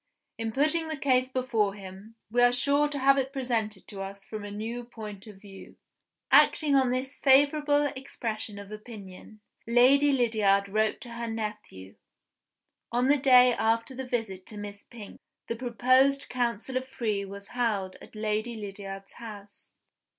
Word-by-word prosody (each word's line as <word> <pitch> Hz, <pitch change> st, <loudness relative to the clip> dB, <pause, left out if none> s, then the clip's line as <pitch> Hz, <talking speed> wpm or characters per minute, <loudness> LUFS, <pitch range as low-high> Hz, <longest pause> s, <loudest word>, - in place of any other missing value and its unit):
"In 225 Hz, 0 st, -2 dB
putting 310 Hz, +6 st, +1 dB
the 315 Hz, -1 st, -3 dB
case 255 Hz, -2 st, +2 dB
before 230 Hz, -6 st, 0 dB
him, 195 Hz, +3 st, -11 dB, 0.2 s
we 245 Hz, +1 st, +2 dB
are 245 Hz, 0 st, +6 dB
sure 285 Hz, +4 st, +2 dB
to 290 Hz, -, -4 dB
have 275 Hz, 0 st, +4 dB
it 265 Hz, 0 st, -2 dB
presented 230 Hz, -7 st, -2 dB
to 195 Hz, -2 st, -7 dB
us 195 Hz, +1 st, -7 dB
from 215 Hz, -2 st, -7 dB
a 205 Hz, -, -6 dB
new 225 Hz, +4 st, -5 dB
point 215 Hz, -4 st, -9 dB
of 205 Hz, -3 st, -12 dB
view." 195 Hz, -1 st, -13 dB, 0.6 s
Acting 300 Hz, -3 st, +5 dB
on 265 Hz, -2 st, +4 dB
this 255 Hz, +2 st, -2 dB
favorable 290 Hz, +2 st, +4 dB
expression 225 Hz, -5 st, -5 dB
of 200 Hz, 0 st, -10 dB
opinion, 215 Hz, -1 st, -11 dB, 0.3 s
Lady 265 Hz, +5 st, +5 dB
Lydiard 215 Hz, -6 st, +2 dB
wrote 215 Hz, +2 st, 0 dB
to 245 Hz, -, -9 dB
her 235 Hz, 0 st, -5 dB
nephew. 210 Hz, -, -6 dB, 0.9 s
On 245 Hz, +2 st, +1 dB
the 290 Hz, -, +5 dB
day 255 Hz, -2 st, +6 dB
after 230 Hz, +3 st, 0 dB
the 265 Hz, +1 st, -5 dB
visit 200 Hz, -6 st, -3 dB
to 210 Hz, -, -7 dB
Miss 205 Hz, 0 st, -8 dB
Pink, 220 Hz, -4 st, -12 dB, 0.3 s
the 230 Hz, -, -2 dB
proposed 255 Hz, +3 st, +2 dB
council 245 Hz, +1 st, -2 dB
of 260 Hz, 0 st, -4 dB
three 225 Hz, -7 st, -2 dB
was 200 Hz, +1 st, -9 dB
held 210 Hz, -6 st, -1 dB
at -, -, -14 dB
Lady 215 Hz, +2 st, -2 dB
Lydiard's 195 Hz, -2 st, -8 dB
house. 205 Hz, -3 st, -12 dB
230 Hz, 160 wpm, -28 LUFS, 205-260 Hz, 0.9 s, are